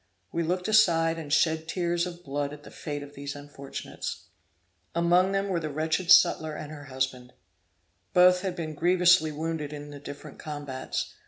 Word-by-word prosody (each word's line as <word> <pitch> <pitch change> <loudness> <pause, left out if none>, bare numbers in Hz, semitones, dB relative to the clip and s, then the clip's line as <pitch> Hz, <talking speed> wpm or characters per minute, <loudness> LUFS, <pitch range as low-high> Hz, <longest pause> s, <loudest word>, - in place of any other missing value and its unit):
We 170 - -1
looked 180 +2 -1
aside 165 -7 +4
and 150 -3 -7
shed 160 +1 +2
tears 175 0 0
of 175 0 -9
blood 145 0 -3
at 150 0 -11
the - - -12
fate 145 -1 -5
of 145 0 -12
these 140 0 -6
unfortunates. 145 -1 -7 0.7
Among 175 +3 +4
them 195 0 0
were 185 -3 0
the 155 -2 -4
wretched 160 +4 0
sutler 155 -1 +6
and 150 - -7
her 145 -2 -9
husband. 130 -2 -3 0.8
Both 180 0 +6
had 185 -2 -3
been 160 -3 -4
grievously 175 0 +4
wounded 155 -1 -3
in 145 0 -8
the 145 - -9
different 145 0 -10
combats. 145 -3 -4
160 Hz, 170 wpm, -27 LUFS, 145-175 Hz, 0.8 s, sutler